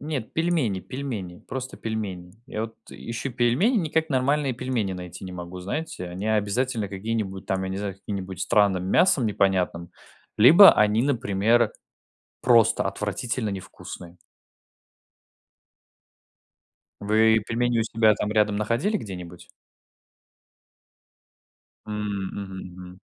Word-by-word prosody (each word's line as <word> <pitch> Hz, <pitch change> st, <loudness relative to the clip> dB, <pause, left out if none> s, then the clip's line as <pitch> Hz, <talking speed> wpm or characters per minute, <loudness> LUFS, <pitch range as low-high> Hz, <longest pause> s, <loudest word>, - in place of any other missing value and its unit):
Нет, 140 Hz, -6 st, -5 dB
пельмени 160 Hz, -, 0 dB
пельмени, 115 Hz, -10 st, -6 dB
просто 130 Hz, 0 st, -6 dB
пельмени. 100 Hz, -6 st, -5 dB
Я 110 Hz, -4 st, -4 dB
вот, 110 Hz, 0 st, -6 dB, 0.2 s
э, -, -, -11 dB
ищу 115 Hz, +3 st, -5 dB
пельмени, 125 Hz, -, +2 dB
никак 160 Hz, -2 st, 0 dB
нормальные 135 Hz, +1 st, +1 dB
пельмени 120 Hz, -5 st, -2 dB
найти 90 Hz, 0 st, -8 dB
не 90 Hz, -, -7 dB
могу. 90 Hz, 0 st, -7 dB
Знаете, 100 Hz, -, -4 dB
они 90 Hz, +4 st, -5 dB
обязательно 110 Hz, +1 st, 0 dB
какие-нибудь 100 Hz, -1 st, -4 dB
там, 95 Hz, 0 st, -1 dB
я 95 Hz, -, -3 dB
не 95 Hz, -, -3 dB
знаю, 100 Hz, -2 st, -4 dB
с -, -, -26 dB
каким-нибудь 95 Hz, -3 st, -6 dB
странным 100 Hz, -3 st, +2 dB
мясом 145 Hz, -, +4 dB
непонятным. 95 Hz, -4 st, 0 dB, 0.5 s
Либо 165 Hz, -, +9 dB
они, 105 Hz, +2 st, +3 dB
например, 115 Hz, -3 st, +2 dB, 0.7 s
просто 115 Hz, -2 st, +4 dB
отвратительно 105 Hz, +3 st, -3 dB
невкусные. 90 Hz, -2 st, -9 dB, 2.8 s
Вы 110 Hz, +2 st, +4 dB
пельмени 120 Hz, +1 st, 0 dB
у -, -, +2 dB
себя 110 Hz, -1 st, +3 dB
там 105 Hz, +1 st, -2 dB
рядом 105 Hz, -1 st, +2 dB
находили 120 Hz, -, 0 dB
где-нибудь? 90 Hz, -, -8 dB, 2.4 s
М, 105 Hz, -, -6 dB, 0.4 s
мгм, 95 Hz, -2 st, -6 dB, 0.2 s
мгм. 90 Hz, 0 st, -11 dB
110 Hz, 120 wpm, -25 LUFS, 95-125 Hz, 2.8 s, Либо